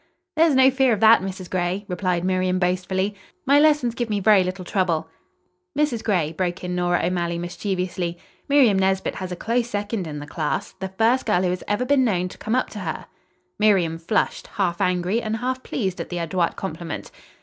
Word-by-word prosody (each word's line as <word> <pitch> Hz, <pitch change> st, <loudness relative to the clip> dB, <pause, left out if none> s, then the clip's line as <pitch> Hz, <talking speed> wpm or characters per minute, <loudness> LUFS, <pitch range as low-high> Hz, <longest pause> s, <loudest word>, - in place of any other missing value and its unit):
"There's 320 Hz, -2 st, +4 dB
no 265 Hz, 0 st, +6 dB
fear 265 Hz, -2 st, +3 dB
of 210 Hz, -, -1 dB
that, 220 Hz, -1 st, +7 dB
Mrs. 190 Hz, -1 st, -6 dB
Gray," 185 Hz, +3 st, -2 dB
replied 180 Hz, -1 st, -1 dB
Miriam 185 Hz, 0 st, +1 dB
boastfully. 185 Hz, +2 st, 0 dB, 0.3 s
"My 280 Hz, +2 st, +5 dB
lessons 295 Hz, -6 st, +3 dB
give 240 Hz, -1 st, -3 dB
me 205 Hz, -1 st, 0 dB
very 200 Hz, -1 st, +5 dB
little 185 Hz, 0 st, -4 dB
trouble." 170 Hz, -4 st, 0 dB, 0.7 s
"Mrs. 290 Hz, -7 st, 0 dB
Gray," 175 Hz, -8 st, +1 dB
broke 180 Hz, +1 st, -2 dB
in 180 Hz, 0 st, -3 dB
Nora 175 Hz, -1 st, +1 dB
O'Malley 170 Hz, -1 st, -1 dB
mischievously, 180 Hz, -1 st, -3 dB, 0.3 s
"Miriam 255 Hz, -9 st, +5 dB
Nesbit 190 Hz, 0 st, +1 dB
has 185 Hz, -1 st, -6 dB
a -, -, -3 dB
close 235 Hz, +5 st, -1 dB
second 205 Hz, -3 st, -3 dB
in 150 Hz, -1 st, -6 dB
the 145 Hz, -, -6 dB
class. 150 Hz, 0 st, -3 dB
The 190 Hz, -, -3 dB
first 225 Hz, +7 st, +1 dB
girl 180 Hz, -, +2 dB
who 180 Hz, -, +1 dB
has 180 Hz, -, -4 dB
ever 205 Hz, +5 st, 0 dB
been 275 Hz, 0 st, +3 dB
known 185 Hz, -6 st, 0 dB
to -, -, -13 dB
come 220 Hz, +2 st, -1 dB
up 255 Hz, -, 0 dB
to 210 Hz, -, -7 dB
her." 165 Hz, -5 st, -4 dB, 0.5 s
Miriam 185 Hz, -6 st, +3 dB
flushed, 185 Hz, +6 st, -1 dB
half 175 Hz, -3 st, -2 dB
angry 180 Hz, +5 st, +1 dB
and 220 Hz, 0 st, -2 dB
half 255 Hz, +2 st, -2 dB
pleased 190 Hz, -9 st, -3 dB
at -, -, -7 dB
the 175 Hz, -, -4 dB
adroit 170 Hz, +1 st, -1 dB
compliment. 170 Hz, -3 st, -6 dB
190 Hz, 195 wpm, -23 LUFS, 180-225 Hz, 0.7 s, that